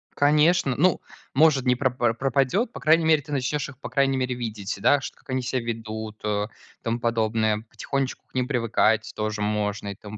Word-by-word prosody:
Конечно. 150 -1 +3
Ну, 175 +4 +2 0.3
может, 140 -2 +4
не 125 0 +4
пропар 125 -3 +1
пропадет. 135 - +1
По - - -8
крайней 160 +1 +4
мере, 155 -2 +4
ты 145 - -12
начнешь 140 +2 -1
их, 130 - -13
по - - -7
крайней 135 -1 +2
мере, 125 -1 -1
видеть, 110 -4 -4
да 145 -1 +4
шт - - -7
как - - -28
они 130 0 0
ся 125 +1 -2
ведут, 110 -2 -6
о, 105 -1 0
и - - -21
тому 115 +1 -1
подобное. 110 -2 0
Потихонечку 135 -2 -3
к - - -37
ним 125 -1 0
привыкать 115 -3 +1
тоже 105 0 -2
можно 105 -1 -1
и 100 - -5
тому 105 +1 -10
125 Hz, 200 wpm, -25 LUFS, 110-140 Hz, 0.3 s, может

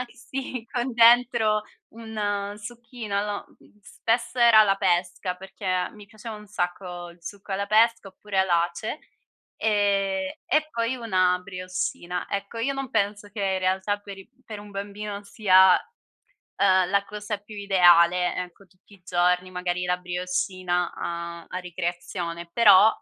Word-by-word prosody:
sì 260 -2 -6
con 250 0 -2
dentro 230 -2 +5 0.3
un 205 -3 -3
succhino. 230 -1 -5
Lo 205 -1 -4
mhmm, 210 - -24
spesso 235 +5 -2
era 235 -2 +7
alla 200 -2 +5
pesca, 180 0 0
perché 185 -1 -3
mi 210 -1 -14
piaceva 220 +1 -9
un 210 0 -12
sacco 175 -1 -4
il 170 0 -18
succo 200 +4 -9
alla 195 +1 -1
pesca, 225 +1 +3
oppure 195 +1 -6
all'ace, 175 - 0 0.6
ehm, 205 +5 +1
e 310 0 +1
poi 230 +2 -1
una 185 -7 +1
brioscina. 185 -1 -4
Ecco 200 +3 -4
io 270 +5 0
non 270 -1 -4
penso 205 -1 -1
che 205 +1 -9
in 190 -1 0
realtà 190 +2 0
per 200 -1 -10
i 195 - -15 0.2
per 215 -2 -7
un 205 0 -11
bambino 200 +1 -6
sia, 190 -3 +5 0.7
uhm, 185 -2 +2
la 200 +1 +2
cosa 210 +1 -5
più 205 +2 -13
ideale, 180 -3 +4
ecco, 180 +2 -7
tutti 185 +2 -24
i 190 - -26
giorni 180 +1 +1
magari 180 0 -2
la 180 0 +1
brioscina 180 0 -2
a 170 0 -5
a 180 - -5
ricreazione, 175 -1 -5
però, 210 -2 +7
200 Hz, 145 wpm, -25 LUFS, 180-215 Hz, 0.7 s, era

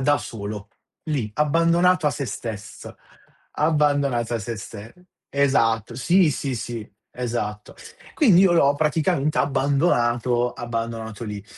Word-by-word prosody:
da 145 +2 +3
solo, 105 -1 -7 0.4
lì, 135 -9 -2
abbandonato 165 +3 +3
a - - +4
sé 140 -2 -4
stesso, 110 -1 -7 0.6
abbandonato 145 -6 +1
a - - 0
sé 110 +2 -5
ste 105 +2 -10 0.3
esatto. 115 -6 +1
Sì, 175 +4 +3
sì, 135 -1 -3
sì, 115 -1 -6 0.2
esatto. 115 -4 -4 0.4
Quindi 200 - +5
io 185 -3 +5
l'ho 145 -4 +4
praticamente 155 0 +1
abbandonato 125 -4 +1
abbandonato 115 -2 -5
lì. 105 -2 -6
130 Hz, 120 wpm, -23 LUFS, 115-150 Hz, 0.6 s, Quindi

